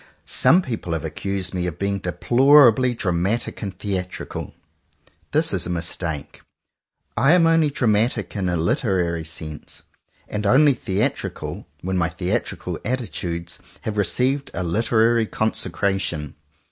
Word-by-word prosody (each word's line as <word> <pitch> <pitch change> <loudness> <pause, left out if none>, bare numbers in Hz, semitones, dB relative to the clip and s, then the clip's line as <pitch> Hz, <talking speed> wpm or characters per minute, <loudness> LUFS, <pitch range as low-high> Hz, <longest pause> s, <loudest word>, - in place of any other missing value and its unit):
Some 180 +3 +4
people 110 - -4
have 80 -2 -3
accused 95 +4 -3
me 90 -1 -1
of 85 - -5
being 100 0 -1
deplorably 125 +5 +5
dramatic 95 +3 -1
and 100 -4 -5
theatrical. 95 -3 -4 0.7
This - - +3
is - - +1
a - - -5
mistake. 85 -3 -3 0.7
I 135 +7 +4
am 175 -2 +5
only 165 -2 +4
dramatic 110 -5 0
in 95 -3 -1
a 90 - 0
literary 85 -1 0
sense, 80 -1 -7 0.4
and 105 -1 -2
only 140 +6 +6
theatrical 100 -4 -3 0.2
when 95 +1 -1
my 85 -1 +1
theatrical 90 +1 -3
atti 120 -2 -3
tudes 85 -1 -4 0.2
have 110 - -4
received 130 +8 0
a 90 - -2
literary 115 +5 +2
consecration. 95 -8 -1
100 Hz, 130 wpm, -22 LUFS, 90-120 Hz, 0.7 s, only